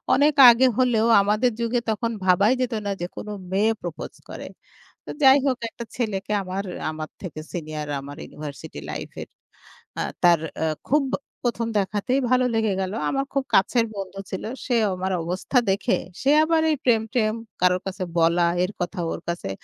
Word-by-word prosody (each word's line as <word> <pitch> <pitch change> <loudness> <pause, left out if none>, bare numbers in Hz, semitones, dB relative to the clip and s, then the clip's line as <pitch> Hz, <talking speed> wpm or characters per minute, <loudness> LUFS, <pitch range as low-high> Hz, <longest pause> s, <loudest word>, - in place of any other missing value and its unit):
অনেক 290 +3 +4 0.2
আগে 250 +2 +5
হলেও 235 -3 +3
আমাদের 215 +5 +2
যুগে 235 +1 +1
তখন 230 +2 -1
ভাবাই 200 +6 +4
যেত 250 -2 -1
না, 200 - -1
যে 175 - -2
কোন - - -7 0.2
মেয়ে 210 +4 +3
প্রপোজ 170 -2 -6 0.2
করে। - - -7 0.6
তো - - -8
যাই 270 +1 +8
হোক, 255 -2 +1
একটা 235 +1 -8
ছেলেকে 210 -4 -2
আমার, 190 +1 -4 0.3
আমার 155 0 -6
থেকে 170 -5 -6
সিনিয়র, 155 -3 -5
আমার 140 +1 -9
ইউনিভার্সিটি 150 -2 -8
লাইফ - - -5
এর। - - -9 0.7
আ - - 0 0.2
তার 175 -2 +6 0.5
খুব 295 +1 +4 0.4
প্রথম 235 -1 0
দেখাতেই 210 +7 0
ভালো 255 0 +4
লেগে 220 -3 +1
গেল। 190 0 -2 0.2
আমার 275 0 -1
খুব 275 -1 +1
কাছের 230 +4 +3
বন্ধু 195 0 -6
ছিল। 190 - -4 0.2
সে 250 - +1 0.2
আমার 185 +1 -3
অবস্থা 185 +9 -1
দেখে, 195 +1 +1 0.2
সে 275 +2 +3
আবার 320 0 +2
এই 300 - 0
প্রেম-ট্রেম 225 -2 +2 0.3
কারো 180 0 +4
কাছে 190 0 -4
বলা, 170 +1 +4 0.2
এর 185 - -1
কথা 180 +2 -3
ওর - - -4
কাছে। 170 -12 -3
205 Hz, 170 wpm, -24 LUFS, 180-245 Hz, 0.7 s, যাই